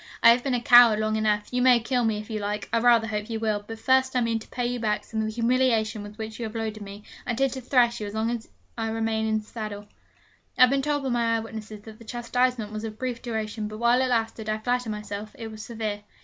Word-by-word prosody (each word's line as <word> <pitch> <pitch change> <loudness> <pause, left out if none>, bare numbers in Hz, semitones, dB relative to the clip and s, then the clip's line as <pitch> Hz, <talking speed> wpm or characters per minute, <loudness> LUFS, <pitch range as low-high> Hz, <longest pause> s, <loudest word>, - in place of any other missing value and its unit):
I 230 - +10
have 240 +1 +2
been 270 -3 0
a - - +1
coward 240 -2 +7
long 215 0 0
enough. 210 -1 0
You 250 - +1
may 250 -1 +6
kill 245 +2 0
me 220 -1 +1
if 210 0 -7
you 220 -2 -3
like. 205 0 -3
I 230 - +4
rather 235 -1 +5
hope 210 0 -4
you 225 -1 -3
will; 215 -2 -1
but 225 - -6
first 260 +3 +2
I 250 - +3
mean 230 -1 0
to - - -13
pay 245 - -3
you 245 0 -2
back 210 -2 -1
some 220 - -5
of 220 - 0
the - - -3
humiliation 230 -2 +1
with 205 +1 -10
which 220 0 -6
you 235 - -3
have 220 +1 -7
loaded 220 -1 -3
me. 200 +1 -9 0.2
I - - 0
intend 265 +2 +1
to 260 - -6
thrash 240 -2 +2
you 210 - -3
as 205 - -7
long 220 +1 0
as 235 -2 -5 0.3
I 225 -1 -2
remain 220 0 -1
in 220 0 +1
the - - -18
saddle.' 215 -2 -6 0.7
I - - +1
have 255 0 +8
been 275 0 +2
told 290 0 -1
by 230 -1 +2
eye - - +1
witnesses 220 -1 -8
that 220 +1 -12
the - - -12
chastisement 240 -1 -1
was 215 0 -5
of 220 -1 -6
brief 250 -1 -4
duration, 220 -2 -3
but 215 0 -7
while 235 +2 +3
it 260 - +2
lasted, 225 -2 -1
I 215 - 0
flatter 245 +1 -1
myself, 210 0 -6
it 225 -1 -7
was 215 0 -9
severe. 220 -3 -4
225 Hz, 275 wpm, -26 LUFS, 215-240 Hz, 0.7 s, I